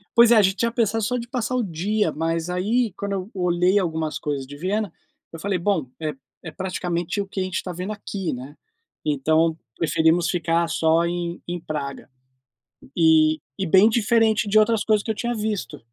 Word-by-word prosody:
Pois 235 0 +7
é, 220 -3 +7
gente 190 0 +2
tinha 230 +3 0
pensado 225 -2 0
só 250 +4 0
de 235 0 -6
passar 250 -1 -2
o 245 - +1
dia, 190 +1 0
mas 165 +2 -2
aí 215 +5 +1
quando 200 0 -4
eu 190 +1 -4
olhei 180 +1 +2
algumas 160 -3 -2
coisas 140 -3 -3
de 145 +1 -10
Viena, 200 +3 -1 0.4
eu 165 - -9
falei: 190 0 -1
"Bom, 170 -9 0
é 155 -2 -2 0.3
é 160 - -7
praticamente 180 0 -3
o 200 - -2
que 195 - -5
a - - +1
gente 185 0 -2
tá 180 - -5
vendo 180 +5 -4
aqui", 200 -3 -4
né, 130 +4 -8 0.5
então 155 +3 +2 0.2
preferimos 165 +1 +2
ficar 170 -1 +1
só 165 +1 +2
em 175 0 -3
em 175 0 -3
Praga 140 -4 -5 0.9
e 160 -2 +4 0.2
e 190 - -1
bem 190 +6 +6
diferente 220 -2 +2
de 215 - +5
outras 215 0 +3
coisas 215 -2 +2
que 225 - -5
eu - - +1
tinha 240 +3 -2
visto. 210 - -3
180 Hz, 190 wpm, -23 LUFS, 160-210 Hz, 0.9 s, Pois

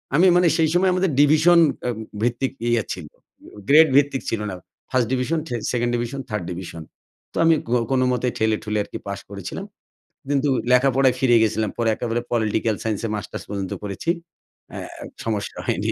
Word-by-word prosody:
আমি 180 +4 +6
মানে 180 0 +5
সেই 160 -1 +3
সময় 185 +1 +3
আমাদের 185 -2 +1
ডিভিশন 155 +4 +5 0.3
আম 120 - -2 0.3
ভিত্তিক 125 +2 0 0.2
ইয়া 120 -3 +2
ছিল, 85 -5 -8 0.6
গ্রেড 155 +3 +8
ভিত্তিক 140 -2 +2
ছিল 110 -2 -2
না। 95 - -5 0.4
1st 125 -3 +2
division, 140 +6 0
the 120 - -3 0.2
2nd 120 -1 0
division, 120 +3 -3
3rd 105 -4 -2
division. 85 -2 -7 0.5
তো - - -7
আমি 165 -1 +5
কো 120 - 0 0.2
কোনোমতেই 125 -1 +1
ঠেলে 110 0 +2
ঠুলে 105 0 -2
আরকি - - -7
পাশ 100 -1 -4
করেছিলাম। 100 - -6 0.6
কিন্তু 145 0 +1 0.2
লেখাপড়ায় 130 0 +4
ফিরে 125 -2 +4
গেছিলাম। 110 -1 0
পরে 115 -1 +1
একেবারে 120 0 -2
পলিটিক্যাল 110 -1 +1
সাইন্স 110 -3 -2
এ - - -5
মাস্টার্স 105 - -6
পর্যন্ত 100 -2 -3
করেছি। 100 - -4 0.6
অ্যা - - -6 0.2
অ্যা - - -9 0.2
সমস্যা 110 -3 -3
হয়নি। - - 0
120 Hz, 175 wpm, -22 LUFS, 110-145 Hz, 0.6 s, গ্রেড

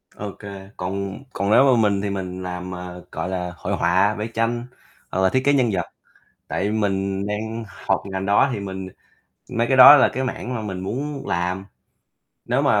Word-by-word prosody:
Ô 105 -1 -5
kê, 100 -1 -9
còn 95 +3 -4
còn 100 +1 -1
nếu 130 - +7
mà 130 -4 +4
mình 100 -1 0
thì 100 - -2
mình 95 -1 -4
làm, 90 0 -5
à, 90 0 -7 0.2
gọi 80 +3 -3
là, 90 -1 -3
hội 100 - -3
họa, 95 +5 +2
vẽ 105 +2 -3
tranh 120 +1 0 0.5
hoặc 95 - 0
là 95 - +4
thiết 130 - +1
kế 140 - +5
nhân 125 -4 +3
vật, 90 -2 -1 0.6
tại 95 +7 -1
mình 100 -2 -1
đang 110 +2 -3
học 100 - -2
ngành 95 -1 -4
đó 100 +7 +4
thì 105 - -3
mình 95 -1 -5 0.6
mấy 115 +1 0
cái 130 - +2
đó 135 +3 +12
là - - +5
cái 130 - -1
mảng 125 -1 -4
mà 115 - -3
mình 95 -4 -5
muốn 135 +9 -4
làm. 90 +2 -1 0.8
Nếu - - +1
mà - - +3
100 Hz, 200 wpm, -22 LUFS, 95-115 Hz, 0.8 s, đó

